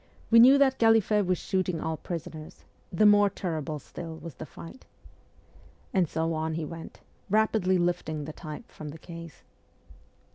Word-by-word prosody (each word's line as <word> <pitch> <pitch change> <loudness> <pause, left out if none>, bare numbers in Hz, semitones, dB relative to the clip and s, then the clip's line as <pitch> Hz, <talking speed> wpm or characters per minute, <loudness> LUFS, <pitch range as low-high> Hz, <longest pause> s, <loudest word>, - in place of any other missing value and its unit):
We 230 - +8
knew 260 +4 +8
that 270 -2 +3
Galliffet 220 -3 +4
was 185 -1 +2
shooting 185 -3 -1
all 160 0 -2
prisoners 160 -2 -8 0.3
the 215 +5 +3
more 205 -1 +6
terrible 160 -6 -4
still 165 +3 -8
was 160 0 -9
the 155 - -9
fight,' 170 - -12 1.1
and 180 -5 +2
so 165 +1 -1
on 160 0 -2
he 160 -1 -3
went, 165 +1 -9 0.3
rapidly 210 -3 +2
lifting 175 -4 -1
the 155 - -7
type 155 -2 -9
from 150 - -8
the 150 - -9
case. 165 0 -11
170 Hz, 155 wpm, -28 LUFS, 160-205 Hz, 1.1 s, We